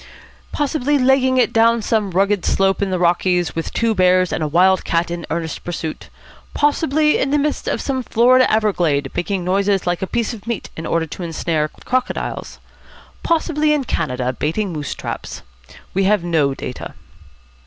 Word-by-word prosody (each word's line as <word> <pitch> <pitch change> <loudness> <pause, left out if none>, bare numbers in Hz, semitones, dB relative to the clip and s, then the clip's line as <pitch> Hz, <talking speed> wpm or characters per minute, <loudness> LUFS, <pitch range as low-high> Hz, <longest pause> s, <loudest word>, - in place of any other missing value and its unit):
Possibly 290 -1 0
legging 260 0 +3
it 250 - +2
down 230 0 +3
some 215 -3 0
rugged 195 +1 +1
slope 195 0 +1
in 200 - 0
the 185 - 0
Rockies, 175 0 +1
with 165 - -3
two 230 -1 +1
bears 185 -2 +3
and - - -2
a 155 - 0
wild 185 +4 +3
cat 170 0 0
in 170 -1 -5
earnest 165 -1 -4
pursuit. 165 -2 -5 0.5
Possibly 300 +1 +2
in - - 0
the 295 - +2
midst 295 0 -1
of - - -1
some 265 -2 -2
Florida 250 +2 +4
everglade, 175 -10 +1
making 190 +2 -1
a - - -6
noise 195 +2 +1
like 175 -1 -1
a 190 - -2
piece 235 +3 -1
of 215 -1 -11
meat 235 -4 -4
in 160 - -6
order 165 -1 0
to 170 +1 -6
snare 155 -1 -1 0.2
crocodiles. 255 0 -2 0.6
Possibly 310 -2 +1
in 290 - -1
Canada, 125 - -2
baiting 170 - -2
moose 150 -3 -4
traps. - - -6 0.5
We 195 +1 +1
have 205 -2 +2
no 155 -6 +1
data." 125 - -7
195 Hz, 175 wpm, -19 LUFS, 170-245 Hz, 0.6 s, Florida